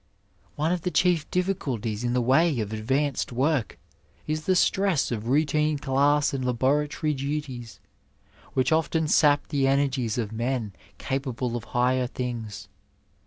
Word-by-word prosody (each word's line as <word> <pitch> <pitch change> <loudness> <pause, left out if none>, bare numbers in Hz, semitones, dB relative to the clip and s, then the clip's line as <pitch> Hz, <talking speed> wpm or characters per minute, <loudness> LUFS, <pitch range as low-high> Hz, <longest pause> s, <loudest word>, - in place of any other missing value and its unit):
One 155 +3 0
of 180 -1 -1
the 180 - -1
chief 180 -3 +2
difficulties 130 - -2
in 120 0 0
the 125 -1 +1
way 135 +3 +3
of 105 -1 -3
advanced 135 +6 -1
work 135 0 0 0.5
is 155 0 -3
the 185 - +3
stress 190 -5 +2
of 115 -1 -3
routine 150 +2 +2
class 140 +1 +2
and 135 -1 -2
laboratory 145 +5 0
duties, 135 -7 -5 0.8
which 130 -1 +2
often 160 0 +1
sap 150 -1 +3
the 140 -3 +1
energies 135 -5 +1
of 110 -3 -2
men 115 -2 -2 0.2
capable 130 -3 -3
of 120 - -5
higher 125 +1 +1
things. 115 -5 -5
135 Hz, 140 wpm, -26 LUFS, 120-150 Hz, 0.8 s, way